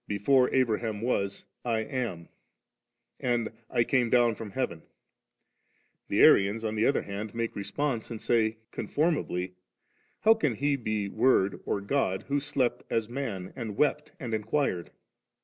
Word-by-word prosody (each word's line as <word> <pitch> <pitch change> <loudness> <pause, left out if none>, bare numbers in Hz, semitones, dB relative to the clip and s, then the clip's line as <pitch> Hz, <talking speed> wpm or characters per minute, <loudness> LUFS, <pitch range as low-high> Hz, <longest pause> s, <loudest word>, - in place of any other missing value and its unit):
Before 125 +6 +3
Abraham 115 -4 +1
was, 100 -5 -1 0.2
I 115 -2 0
am, 115 - -4 0.9
and 120 -3 0 0.2
I 120 - +2
came 125 -1 +2
down 120 -1 +4
from 110 -1 -7
heaven*?* 100 -8 -3 1.3
the - - +2
Arians 105 +3 +5
on 110 - -1
the 110 +1 +2
other 140 - +2
hand 105 +2 -6
make 115 0 -2
response 120 +3 -2
3 - - -6
and - - -7
say 110 -1 +1
conformably, 120 - -1 0.3
* - - -40
How 220 - +7
can 150 - 0
He 145 +4 +1
be 110 -5 -2
Word 110 -3 +2
or 100 - 0
God 100 -4 0
who 145 +1 +2
slept 135 -3 0
as 115 -1 0
man, 115 -8 -4
and 115 -5 -5
wept, 150 0 +1
and 120 -4 -4
inquired?' 110 - -1
115 Hz, 150 wpm, -28 LUFS, 105-130 Hz, 1.3 s, How